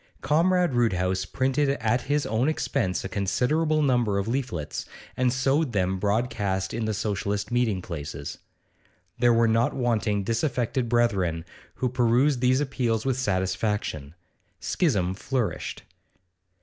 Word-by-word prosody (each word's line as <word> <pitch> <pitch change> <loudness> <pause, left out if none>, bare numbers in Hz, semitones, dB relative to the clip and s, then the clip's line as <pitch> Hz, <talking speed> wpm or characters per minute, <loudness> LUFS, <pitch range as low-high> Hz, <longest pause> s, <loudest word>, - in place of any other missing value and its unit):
Comrade 175 +1 +2
Roodhouse 95 -6 +1
printed 135 +7 0
at 120 +2 +1
his 145 0 +1
own 115 +6 +1
expense 95 - -1
a - - -3
considerable 150 +11 +1
number 120 -7 +2
of 100 +1 -1
leaflets, 115 - -3 0.3
and 125 -1 +2
sowed 135 +2 +1
them 95 -1 0
broadcast 100 -3 -1
in 115 -1 -2
the 110 - -1
Socialist 100 0 -2
meeting 115 -7 +1
places. 75 -4 -6 0.8
There 120 0 +5
were 115 0 +4
not 115 +1 +2
wanting 110 -5 0
disaffected 120 +2 -1
brethren, 95 -9 +1 0.3
who 130 - -1
perused 125 +2 +2
these 130 +1 +3
appeals 125 -5 -1
with 130 -1 0
satisfaction. 95 - -1 0.4
Schism 100 - 0
flourished. 110 -2 -3
115 Hz, 125 wpm, -26 LUFS, 95-130 Hz, 0.8 s, There